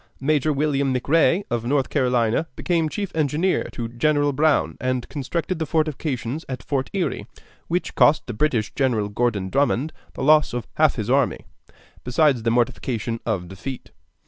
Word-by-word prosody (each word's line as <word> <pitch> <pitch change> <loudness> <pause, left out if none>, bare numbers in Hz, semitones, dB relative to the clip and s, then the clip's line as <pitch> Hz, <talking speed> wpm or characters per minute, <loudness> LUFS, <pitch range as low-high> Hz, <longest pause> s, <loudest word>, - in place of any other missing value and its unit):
Major 150 +2 +1
William 140 -2 +1
McRee, 165 +8 +3
of 120 -1 -1
North 135 +2 0
Carolina, 125 +3 +1
became 165 -3 0
chief 200 +2 -4
engineer 160 +4 +1
to 120 -2 -4
General 145 +4 +1
Brown 135 - +2
and 130 -1 -1
constructed 165 +5 -3
the 160 - -2
fortifications 155 -3 -1
at 130 - -5
Fort 135 -2 -2
Erie, 190 -3 -2 0.4
which 175 +2 -2
cost 150 +1 +4
the 120 - -5
British 115 -3 0
General 115 -7 0
Gordon 105 -4 -1
Drummond 140 +1 +1 0.2
the - - -4
loss 150 -1 +4
of 120 -3 -3
half 155 -2 +4
his 110 0 -2
army, 135 -1 +1 0.6
besides 130 0 +2
the 115 - 0
mortification 115 -1 -1
of 95 -6 -1
defeat. 125 +9 -7
135 Hz, 155 wpm, -23 LUFS, 120-155 Hz, 0.6 s, cost